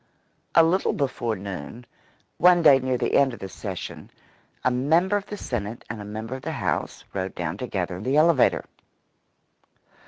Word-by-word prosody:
A 165 Hz, -, +8 dB
little 180 Hz, +4 st, +2 dB
before 120 Hz, -5 st, -1 dB
noon, 100 Hz, +4 st, -7 dB, 0.5 s
one 175 Hz, -1 st, +6 dB
day 140 Hz, -4 st, +8 dB
near 130 Hz, -1 st, -1 dB
the -, -, -1 dB
end 135 Hz, -3 st, +4 dB
of -, -, -15 dB
the 95 Hz, -, -6 dB
session, 95 Hz, -1 st, -7 dB, 0.5 s
a 125 Hz, -, +3 dB
member 160 Hz, +10 st, +2 dB
of 200 Hz, 0 st, -2 dB
the 210 Hz, -, -6 dB
Senate 115 Hz, -, -4 dB
and 110 Hz, -2 st, -6 dB
a -, -, -7 dB
member 110 Hz, +3 st, -6 dB
of 130 Hz, -, -6 dB
the -, -, -4 dB
House -, -, -2 dB
rode 95 Hz, -1 st, -3 dB
down 85 Hz, -1 st, -3 dB
together 95 Hz, -6 st, -3 dB
in -, -, -8 dB
the 130 Hz, +5 st, +1 dB
elevator. 155 Hz, -3 st, +4 dB
125 Hz, 175 wpm, -25 LUFS, 100-150 Hz, 0.5 s, A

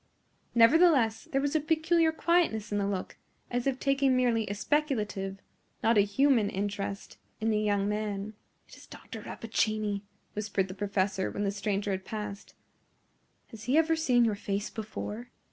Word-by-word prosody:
Nevertheless, 235 Hz, -2 st, +5 dB
there 270 Hz, -, +2 dB
was 285 Hz, +2 st, -1 dB
a -, -, +5 dB
peculiar 320 Hz, +1 st, +2 dB
quietness 320 Hz, -11 st, +1 dB
in 205 Hz, -, 0 dB
the 200 Hz, -, 0 dB
look, 195 Hz, -2 st, -4 dB, 0.3 s
as 245 Hz, +1 st, -1 dB
if 265 Hz, -2 st, +1 dB
taking 275 Hz, -2 st, +2 dB
merely 235 Hz, -3 st, +2 dB
a 205 Hz, -, -3 dB
speculative, 210 Hz, -8 st, -1 dB, 0.5 s
not 230 Hz, +1 st, +4 dB
a 205 Hz, -, +6 dB
human 225 Hz, +1 st, +3 dB
interest, 200 Hz, 0 st, -4 dB, 0.2 s
in 225 Hz, +1 st, +1 dB
the 210 Hz, -, +2 dB
young 205 Hz, -1 st, +1 dB
man. 210 Hz, 0 st, -3 dB, 0.3 s
"It -, -, -14 dB
is -, -, -15 dB
Dr. -, -, -10 dB
Rappaccini!" 215 Hz, -2 st, -1 dB, 0.3 s
whispered 200 Hz, -2 st, -1 dB
the -, -, -5 dB
professor 195 Hz, -1 st, -1 dB
when 205 Hz, -, -3 dB
the 200 Hz, -, +1 dB
stranger 200 Hz, 0 st, -2 dB
had 190 Hz, 0 st, -2 dB
passed. 210 Hz, -1 st, -6 dB, 0.9 s
"Has 225 Hz, -1 st, -10 dB
he 260 Hz, +5 st, +2 dB
ever 325 Hz, 0 st, +4 dB
seen 250 Hz, -7 st, +3 dB
your 220 Hz, -, +2 dB
face 200 Hz, 0 st, -3 dB
before?" 220 Hz, +2 st, -6 dB
215 Hz, 160 wpm, -29 LUFS, 200-265 Hz, 0.9 s, a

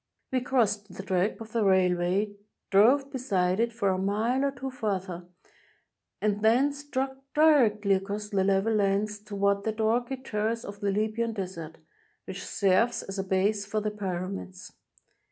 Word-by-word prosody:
We 255 Hz, -1 st, +1 dB
crossed 215 Hz, -6 st, 0 dB
the 190 Hz, -, -6 dB
track 190 Hz, +1 st, 0 dB
of 220 Hz, -1 st, -9 dB
the 230 Hz, -1 st, +1 dB
railway, 190 Hz, +1 st, +2 dB, 0.4 s
drove 260 Hz, +8 st, +5 dB
beside 195 Hz, -8 st, 0 dB
it 235 Hz, 0 st, +1 dB
for 215 Hz, -4 st, 0 dB
a 185 Hz, 0 st, 0 dB
mile 220 Hz, +7 st, 0 dB
or 280 Hz, -, +2 dB
two 265 Hz, 0 st, -6 dB
farther, 190 Hz, -7 st, -3 dB, 0.9 s
and 210 Hz, -1 st, 0 dB
then 250 Hz, +6 st, +4 dB
struck 270 Hz, -2 st, -3 dB, 0.2 s
directly 235 Hz, -10 st, +4 dB
across 200 Hz, +2 st, -2 dB
the 195 Hz, -2 st, +1 dB
level 195 Hz, +3 st, +2 dB
lands 205 Hz, 0 st, +1 dB
toward 200 Hz, -1 st, 0 dB
that 220 Hz, 0 st, -2 dB
rocky 240 Hz, +4 st, +1 dB
terrace 230 Hz, -2 st, -2 dB
of 200 Hz, 0 st, -8 dB
the 205 Hz, -1 st, -1 dB
Libyan 220 Hz, +3 st, -1 dB
Desert, 180 Hz, -6 st, -6 dB, 0.5 s
which -, -, -7 dB
serves 200 Hz, +5 st, +1 dB
as 195 Hz, 0 st, -6 dB
a -, -, 0 dB
base 195 Hz, +2 st, +1 dB
for 215 Hz, +1 st, -1 dB
the 210 Hz, 0 st, -2 dB
Pyramids. 185 Hz, -1 st, -5 dB
210 Hz, 155 wpm, -28 LUFS, 195-230 Hz, 0.9 s, drove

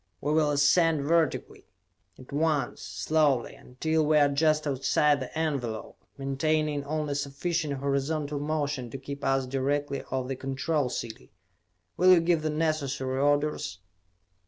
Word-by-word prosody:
We 150 Hz, -, -1 dB
will 155 Hz, -1 st, +3 dB
ascend 145 Hz, +1 st, +3 dB
vertically, 165 Hz, +1 st, 0 dB, 0.5 s
at 130 Hz, -, -14 dB
once 150 Hz, -3 st, 0 dB
slowly 150 Hz, -6 st, +1 dB
until 160 Hz, +5 st, -1 dB
we 155 Hz, 0 st, +3 dB
are 145 Hz, -1 st, +5 dB
just 155 Hz, +2 st, +2 dB
outside 145 Hz, +1 st, +2 dB
the 130 Hz, +4 st, -6 dB
envelope, 135 Hz, -9 st, -3 dB
maintaining 145 Hz, +2 st, 0 dB
only 150 Hz, 0 st, -2 dB
sufficient 145 Hz, +2 st, -2 dB
horizontal 140 Hz, +2 st, -1 dB
motion 145 Hz, -4 st, -2 dB
to 135 Hz, -, -6 dB
keep 140 Hz, +1 st, -8 dB
us 135 Hz, -1 st, +1 dB
directly 140 Hz, +2 st, -1 dB
over 130 Hz, 0 st, -2 dB
the 135 Hz, -, -2 dB
Control 135 Hz, +2 st, -1 dB
City. 110 Hz, -, -6 dB, 0.7 s
Will 185 Hz, +1 st, +7 dB
you 180 Hz, -, +6 dB
give 165 Hz, -1 st, +2 dB
the 155 Hz, -, -1 dB
necessary 140 Hz, -4 st, -1 dB
orders?" 145 Hz, -8 st, 0 dB
145 Hz, 135 wpm, -28 LUFS, 135-155 Hz, 0.7 s, Will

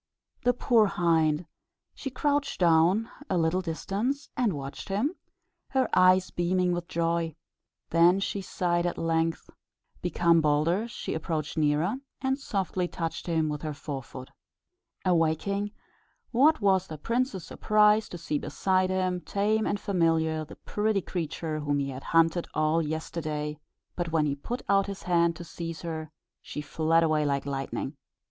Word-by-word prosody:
The 245 Hz, 0 st, +2 dB
poor 230 Hz, -3 st, +4 dB
hind! 165 Hz, -3 st, +2 dB, 0.5 s
she 270 Hz, -, -5 dB
crouched 285 Hz, +2 st, 0 dB
down 175 Hz, +5 st, +4 dB
at 290 Hz, -, -14 dB
a 185 Hz, -, +1 dB
little 165 Hz, +2 st, +2 dB
distance, 205 Hz, -, -2 dB
and 245 Hz, -4 st, +2 dB
watched 140 Hz, +2 st, -7 dB
him, 220 Hz, -, 0 dB, 0.6 s
her 265 Hz, -1 st, +2 dB
eyes 185 Hz, 0 st, +5 dB
beaming 180 Hz, +1 st, +1 dB
with 175 Hz, -1 st, -2 dB
joy. 165 Hz, -2 st, -1 dB, 0.6 s
Then 170 Hz, +3 st, +5 dB
she 200 Hz, 0 st, -2 dB
sighed: 175 Hz, -2 st, 0 dB
at 175 Hz, -, -3 dB
length, 165 Hz, 0 st, -1 dB, 0.5 s
become 170 Hz, -1 st, +3 dB
bolder, 155 Hz, +8 st, +2 dB
she 235 Hz, -, -5 dB
approached 160 Hz, -1 st, -3 dB
nearer, 155 Hz, -, +1 dB, 0.2 s
and 265 Hz, +1 st, 0 dB
softly 190 Hz, -7 st, -1 dB
touched 165 Hz, 0 st, -4 dB
him 160 Hz, -2 st, +1 dB
with 150 Hz, -1 st, -3 dB
her 155 Hz, -2 st, -4 dB
fore 140 Hz, -1 st, -5 dB
foot. 130 Hz, 0 st, -10 dB, 0.7 s
Awaking, 180 Hz, +4 st, +1 dB, 0.6 s
what 280 Hz, +4 st, +4 dB
was 190 Hz, -2 st, +3 dB
the 155 Hz, -, -7 dB
prince's 230 Hz, -, -1 dB
surprise 215 Hz, 0 st, +3 dB
to 175 Hz, -, -6 dB
see 155 Hz, -3 st, -2 dB
beside 185 Hz, -1 st, +1 dB
him, 185 Hz, -1 st, 0 dB
tame 215 Hz, +4 st, 0 dB
and 205 Hz, -, -1 dB
familiar, 165 Hz, -5 st, +1 dB
the 150 Hz, -, -11 dB
pretty 210 Hz, -1 st, -1 dB
creature 160 Hz, -3 st, -3 dB
whom 145 Hz, -1 st, 0 dB
he 140 Hz, -1 st, -1 dB
had 130 Hz, +1 st, -8 dB
hunted 165 Hz, +1 st, +3 dB
all 155 Hz, +2 st, +2 dB
yesterday; 155 Hz, -1 st, -3 dB, 0.4 s
but 175 Hz, -2 st, -2 dB
when 155 Hz, -2 st, +2 dB
he 145 Hz, -, 0 dB
put 235 Hz, -, -5 dB
out 195 Hz, 0 st, +3 dB
his 200 Hz, -1 st, -6 dB
hand 170 Hz, -1 st, +2 dB
to 175 Hz, -, -8 dB
seize 165 Hz, -1 st, -6 dB
her, 160 Hz, -2 st, -5 dB, 0.3 s
she -, -, -7 dB
fled 160 Hz, +2 st, +2 dB
away 155 Hz, -2 st, +2 dB
like 140 Hz, -2 st, 0 dB
lightning. 135 Hz, +1 st, -3 dB
170 Hz, 155 wpm, -28 LUFS, 155-195 Hz, 0.7 s, eyes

